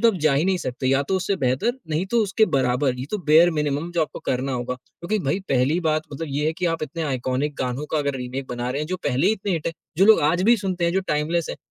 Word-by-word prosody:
तो 230 Hz, -, +6 dB
आप -, -, -6 dB
जा 155 Hz, -2 st, +3 dB
ही 150 Hz, +5 st, +2 dB
नहीं 190 Hz, -1 st, +2 dB
सकते 130 Hz, -2 st, -4 dB
या 135 Hz, +1 st, +3 dB
तो 190 Hz, -, +2 dB
उससे 185 Hz, +2 st, 0 dB
बेहतर, 130 Hz, -, +1 dB, 0.2 s
नहीं 160 Hz, +3 st, 0 dB
तो 235 Hz, -, +1 dB
उसके 215 Hz, +2 st, +2 dB
बराबर 125 Hz, 0 st, +1 dB
ये 125 Hz, -, -3 dB
तो 210 Hz, -, -1 dB
बेयर 160 Hz, +3 st, +6 dB
मिनिमम 150 Hz, +1 st, -1 dB
जो 170 Hz, -, 0 dB
आपको 155 Hz, -, -5 dB
करना 130 Hz, +1 st, -1 dB
होगा 125 Hz, 0 st, -2 dB
क्योंकि 170 Hz, +10 st, -5 dB
भई 140 Hz, +7 st, +1 dB
पहली 135 Hz, +5 st, +2 dB
बात 155 Hz, -2 st, +1 dB
मतलब 165 Hz, +4 st, -4 dB
ये 145 Hz, +2 st, 0 dB
है 160 Hz, -, +1 dB
कि 180 Hz, +2 st, -2 dB
आप 165 Hz, -, -4 dB
इतने 160 Hz, +3 st, -4 dB
आइकॉनिक 135 Hz, 0 st, -1 dB
गानों 130 Hz, +3 st, -2 dB
का 155 Hz, -, +1 dB
अगर 145 Hz, -1 st, -1 dB
रीमेक 130 Hz, +1 st, -5 dB
बना 120 Hz, 0 st, -3 dB
रहे 140 Hz, -, -2 dB
हैं 150 Hz, -, -3 dB
जो 185 Hz, +2 st, -2 dB
पहले 125 Hz, +2 st, +1 dB
ही 215 Hz, -, +4 dB
इतने 200 Hz, -2 st, -2 dB
हिट 165 Hz, -3 st, -2 dB
हैं, 165 Hz, -, -1 dB, 0.2 s
जो 190 Hz, -, +5 dB
लोग 220 Hz, -, +7 dB
आज 170 Hz, +5 st, +2 dB
भी 235 Hz, +4 st, +5 dB
सुनते 185 Hz, -4 st, -2 dB
है, 170 Hz, -, +2 dB
जो 190 Hz, -, +2 dB
टाइमलेस 150 Hz, +3 st, 0 dB
हैं, -, -, -6 dB
150 Hz, 280 wpm, -23 LUFS, 135-175 Hz, 0.2 s, लोग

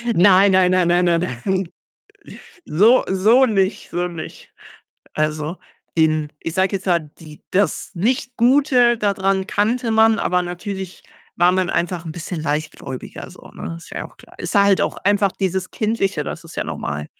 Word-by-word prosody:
Nein, 195 Hz, +2 st, +6 dB
nein, 185 Hz, -1 st, +4 dB
nein, 185 Hz, -2 st, +3 dB
nein, 175 Hz, +1 st, +3 dB
nein, 170 Hz, -1 st, +2 dB, 0.2 s
nein. 190 Hz, -2 st, 0 dB, 1.0 s
So 220 Hz, -, +4 dB
so 220 Hz, +8 st, +4 dB
nicht 195 Hz, -3 st, -1 dB
so 175 Hz, +1 st, -1 dB
nicht. 170 Hz, -2 st, -9 dB, 0.6 s
Also, 155 Hz, +2 st, -2 dB, 0.4 s
den 155 Hz, -2 st, +2 dB
ich 165 Hz, -, -4 dB
sage 190 Hz, +2 st, +1 dB
jetzt 195 Hz, -, -9 dB
mal, 175 Hz, -2 st, +3 dB, 0.2 s
die 155 Hz, -2 st, -13 dB
das 200 Hz, +2 st, 0 dB
nicht 240 Hz, +6 st, -1 dB
Gute 245 Hz, -1 st, +4 dB
da 205 Hz, -2 st, +1 dB
dran 190 Hz, 0 st, 0 dB
kannte 225 Hz, +4 st, 0 dB
man, 220 Hz, 0 st, +4 dB
aber 180 Hz, 0 st, +1 dB
natürlich 185 Hz, +1 st, -6 dB, 0.3 s
war 175 Hz, +1 st, +4 dB
man 185 Hz, -1 st, 0 dB
einfach 175 Hz, -1 st, -2 dB
'n 160 Hz, -, -6 dB
bisschen 170 Hz, 0 st, -6 dB
leichtgläubiger 145 Hz, -3 st, -5 dB
so, -, -, -15 dB
ne? 85 Hz, 0 st, -7 dB
Ist -, -, -15 dB
ja -, -, -5 dB
auch -, -, -23 dB
klar. -, -, -18 dB
Ist -, -, -5 dB
halt 200 Hz, -1 st, +4 dB
auch -, -, -2 dB
einfach 200 Hz, 0 st, +1 dB
dieses 190 Hz, -1 st, -2 dB
Kindliche, 215 Hz, -3 st, -1 dB
das -, -, -7 dB
ist -, -, -12 dB
ja -, -, -2 dB
normal. 75 Hz, +1 st, -5 dB
190 Hz, 170 wpm, -20 LUFS, 170-205 Hz, 1.0 s, Nein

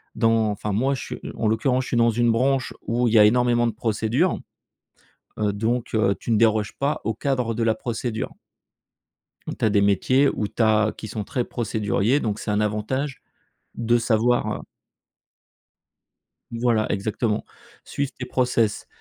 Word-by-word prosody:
dans 115 Hz, -1 st, +2 dB
enfin 105 Hz, 0 st, -3 dB
moi, 130 Hz, +6 st, +1 dB
je -, -, -6 dB
suis -, -, -6 dB, 0.2 s
en 110 Hz, -, 0 dB
l'occurrence, 125 Hz, +4 st, +1 dB
je -, -, -8 dB
suis 120 Hz, -, 0 dB
dans 115 Hz, 0 st, +4 dB
une 120 Hz, +1 st, +2 dB
branche 130 Hz, +3 st, +1 dB
où 120 Hz, +1 st, 0 dB
il 110 Hz, -, 0 dB
y 110 Hz, -, +7 dB
a 105 Hz, -, +9 dB
énormément 120 Hz, +1 st, +3 dB
de -, -, 0 dB
procédures, 115 Hz, -, 0 dB, 1.0 s
heu, 105 Hz, -1 st, +1 dB
donc 115 Hz, +3 st, -2 dB
heu, 100 Hz, -2 st, +2 dB
tu -, -, -4 dB
ne 110 Hz, -, +4 dB
déroges 110 Hz, -2 st, +2 dB
pas 140 Hz, +2 st, 0 dB
au 110 Hz, -, 0 dB
cadre 125 Hz, -2 st, -1 dB
de 115 Hz, +1 st, -1 dB
la 110 Hz, -1 st, +2 dB
procédure. 115 Hz, 0 st, -4 dB, 1.3 s
Tu -, -, -2 dB
as 110 Hz, -, +3 dB
des 105 Hz, -, +3 dB
métiers 115 Hz, +8 st, +3 dB
où 105 Hz, -, -2 dB
tu -, -, -2 dB
as 110 Hz, -1 st, +3 dB
qui 110 Hz, -, -8 dB
sont 105 Hz, 0 st, -4 dB
très 120 Hz, +3 st, -2 dB
procéduriers, 110 Hz, +3 st, 0 dB
donc 105 Hz, -2 st, -2 dB
c'est 105 Hz, -, -4 dB
un 105 Hz, +1 st, +1 dB
avantage 120 Hz, +7 st, -2 dB, 0.5 s
de 120 Hz, +1 st, +2 dB
savoir, 115 Hz, +1 st, +1 dB
heu -, -, -11 dB, 1.9 s
voilà 115 Hz, -2 st, +1 dB
exactement, 105 Hz, +2 st, -1 dB, 0.4 s
suivre 140 Hz, -1 st, -3 dB
tes 125 Hz, -, -4 dB
process, 125 Hz, -4 st, 0 dB
115 Hz, 170 wpm, -23 LUFS, 110-125 Hz, 1.9 s, a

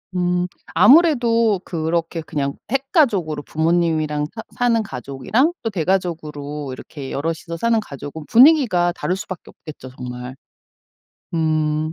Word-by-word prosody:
음 180 Hz, 0 st, +1 dB, 0.3 s
아무래도 230 Hz, -, +5 dB
그렇게 165 Hz, 0 st, -2 dB
그냥 140 Hz, -3 st, -3 dB, 0.2 s
핵가족으로 240 Hz, -, +1 dB
부모님이랑 160 Hz, -2 st, 0 dB
사 220 Hz, -, -6 dB
사는 240 Hz, -2 st, +2 dB
가족이랑 195 Hz, -, -1 dB
또 225 Hz, -, 0 dB
대가족으로 155 Hz, -6 st, -2 dB
이렇게 135 Hz, +1 st, -8 dB
여럿이서 165 Hz, +3 st, -3 dB
사는 230 Hz, +5 st, +2 dB
가족은 145 Hz, -3 st, -8 dB
분위기가 235 Hz, -, +5 dB
다를 180 Hz, +1 st, -2 dB
수 -, -, -7 dB
밖에 185 Hz, -, -8 dB
없겠죠. 150 Hz, -4 st, -11 dB
정말. 125 Hz, 0 st, -7 dB, 1.0 s
음. 155 Hz, -1 st, 0 dB
165 Hz, 300 characters per minute, -20 LUFS, 150-215 Hz, 1.0 s, 아무래도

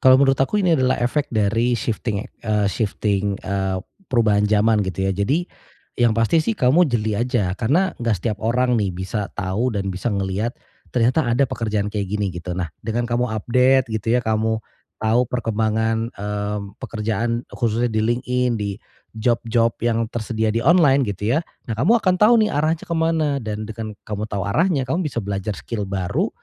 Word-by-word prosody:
Kalau 130 Hz, 0 st, +7 dB
menurut 135 Hz, -1 st, +3 dB
aku 205 Hz, +9 st, +2 dB
ini 175 Hz, -2 st, +3 dB
adalah 130 Hz, 0 st, +2 dB
efek 140 Hz, +4 st, 0 dB
dari 115 Hz, +3 st, +1 dB
shifting, 110 Hz, -2 st, -2 dB
ya -, -, -9 dB, 0.2 s
eee, 105 Hz, -1 st, +2 dB
shifting, 100 Hz, -2 st, -1 dB
eee, 95 Hz, -1 st, -1 dB, 0.3 s
perubahan 105 Hz, -4 st, +3 dB
zaman 110 Hz, 0 st, +3 dB
gitu 95 Hz, +1 st, -2 dB
ya. -, -, +1 dB
Jadi 135 Hz, -, 0 dB, 0.5 s
yang 115 Hz, -2 st, +3 dB
pasti 115 Hz, +9 st, +3 dB
sih 220 Hz, +6 st, -1 dB
kamu 145 Hz, +7 st, +4 dB
jeli 110 Hz, -4 st, 0 dB
aja 120 Hz, -7 st, 0 dB
karena 150 Hz, -, +1 dB
nggak 115 Hz, -4 st, +1 dB
setiap 105 Hz, +4 st, -3 dB
orang, 120 Hz, +1 st, +2 dB
nih, 100 Hz, -, 0 dB
bisa 100 Hz, +2 st, -3 dB
tahu 105 Hz, +6 st, -1 dB
dan 95 Hz, -1 st, -2 dB
bisa 95 Hz, +6 st, -2 dB
ngeliat 100 Hz, +3 st, -2 dB, 0.4 s
ternyata 125 Hz, +5 st, +2 dB
ada 120 Hz, +4 st, +3 dB
pekerjaan 110 Hz, -5 st, -2 dB
kayak 100 Hz, -2 st, -2 dB
gini 105 Hz, -1 st, -1 dB
gitu. 90 Hz, +1 st, -5 dB
Nah, 90 Hz, -2 st, -2 dB
dengan 115 Hz, +2 st, -2 dB
kamu 120 Hz, +1 st, 0 dB
update 125 Hz, +4 st, +3 dB
gitu 110 Hz, +1 st, -1 dB
ya -, -, +2 dB
kamu 110 Hz, 0 st, 0 dB, 0.4 s
tahu 115 Hz, +3 st, +3 dB
perkembangan, 110 Hz, -1 st, 0 dB
mmm, 105 Hz, +1 st, -4 dB
pekerjaan 115 Hz, 0 st, -2 dB
khususnya 120 Hz, 0 st, 0 dB
di 110 Hz, -, +1 dB
LinkedIn 125 Hz, +1 st, 0 dB
di 105 Hz, -1 st, -2 dB, 0.4 s
job-job 115 Hz, 0 st, +1 dB
yang 115 Hz, -1 st, +1 dB
tersedia 110 Hz, -1 st, -2 dB
di 115 Hz, -, 0 dB
online 140 Hz, -4 st, +5 dB
gitu 105 Hz, +5 st, -1 dB
ya. -, -, +4 dB, 0.3 s
Nah, 115 Hz, -, -1 dB
kamu 170 Hz, -, +4 dB
akan 185 Hz, -3 st, +2 dB
tahu, 215 Hz, +3 st, +7 dB
nih, -, -, 0 dB
arahnya 155 Hz, +2 st, 0 dB
ke 170 Hz, -, -1 dB
mana 160 Hz, -3 st, +1 dB
dan 110 Hz, 0 st, -4 dB
dengan 110 Hz, 0 st, -5 dB, 0.2 s
kamu 105 Hz, 0 st, -3 dB
tahu 100 Hz, -2 st, -2 dB
arahnya 155 Hz, -, +2 dB
kamu 170 Hz, +5 st, 0 dB
bisa 120 Hz, -, -4 dB
belajar 100 Hz, +1 st, -2 dB
skill 105 Hz, -4 st, -4 dB
baru 95 Hz, -2 st, -1 dB
115 Hz, 180 wpm, -21 LUFS, 105-125 Hz, 0.5 s, Kalau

